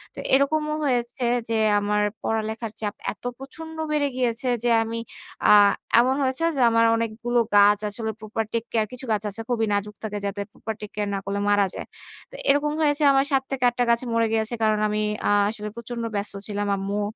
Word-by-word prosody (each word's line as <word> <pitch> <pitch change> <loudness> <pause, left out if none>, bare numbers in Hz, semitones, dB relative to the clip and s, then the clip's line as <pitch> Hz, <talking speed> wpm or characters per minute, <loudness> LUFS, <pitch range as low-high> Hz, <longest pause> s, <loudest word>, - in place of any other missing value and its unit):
তো - - -8
এরকমও 300 +3 +2
হয়েছে 245 -1 -1 0.2
যে, 225 - 0 0.2
আমার 210 0 0 0.2
পড়ালেখার 220 0 -2
চাপ 205 -1 -2 0.2
এত - - -15
প্রচন্ড 320 +4 -9 0.2
বেড়ে 295 -1 +2
গিয়েছে 245 0 -1 0.2
যে 240 - +2
আমি 230 +1 -4 0.5
আ - - +8 0.5
এমন 255 +2 +3
হয়েছে 265 +4 -1
যে, 270 - 0
আমার 230 0 +4
অনেকগুলো 230 +2 -1 0.2
গাছ 205 0 +6
আসলে 220 +2 -4
প্রপার 220 +1 -3
টেক 230 - 0
কেয়ার 220 -2 +1
কিছু 250 +1 -8
গাছ 215 -1 0
আছে 205 +3 -6
খুবই 225 -2 +1
নাজুক 205 +1 -2
থাকে 210 -1 -3
যাতে 200 0 -3
প্রপার 220 - -5
টেক 210 - -7
কেয়ার 205 -1 -1
না - - -1
করলে 200 +1 -2
মারা 205 -1 +4
যায়। - - -7 0.4
তো - - -11
এরকম 290 +1 +3
হয়েছে, 295 0 +2
আমার 270 0 +3
৭ 270 -1 +2
থেকে 265 -2 -2
৮ 240 - -13
টা - - +5
গাছ 235 0 +3
মরে 230 0 +2
গিয়েছে। 225 +1 0
কারণ 215 -1 +3
আমি 210 0 -1 0.3
আ - - +3 0.2
আসলে 210 -1 -5
প্রচন্ড 235 0 -6
ব্যস্ত 200 +1 -3
ছিলাম 205 -1 -2
আম্মু 200 +2 -2
225 Hz, 200 wpm, -24 LUFS, 210-255 Hz, 0.5 s, আ